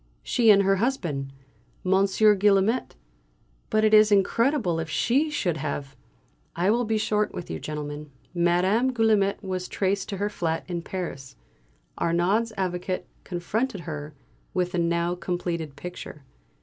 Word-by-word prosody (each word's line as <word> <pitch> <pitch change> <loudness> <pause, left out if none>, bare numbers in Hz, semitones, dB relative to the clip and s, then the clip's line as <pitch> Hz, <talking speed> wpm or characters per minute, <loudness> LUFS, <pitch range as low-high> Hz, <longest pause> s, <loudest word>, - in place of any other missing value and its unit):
She 235 -3 +2
and 200 -1 +7
her 195 0 +3
husband, 170 - -1 0.5
Monsieur 195 +3 +4
Guillaumet. 205 +4 +2 0.7
But 215 0 +2
it 215 - +3
is 215 0 +7
incredible 205 - +2
if 165 0 -4
she 265 - +1
should 180 - -1
have 140 -2 -4 0.3
" - - -39
I 200 - +5
will 240 +2 +1
be 220 0 0
short 210 0 0
with 175 - -6
you, - - -4
gentlemen. 150 0 -6 0.2
Madame 180 +8 +2
Guillaumet 215 -4 +2
was 185 -1 -3
traced 195 0 -1
to 200 - -3
her 205 +2 0
flat 165 -5 -2
in 175 -2 -3
Paris. 150 -8 -6 0.6
Arnaud's 185 +7 +1
Avocat 185 0 -2 0.2
confronted 200 +4 -2
her 150 -3 -7 0.4
with 180 -1 0
the 180 - -1
now 170 +1 +1
completed 170 -4 -3
picture. 175 -3 -8
185 Hz, 145 wpm, -25 LUFS, 170-215 Hz, 0.7 s, and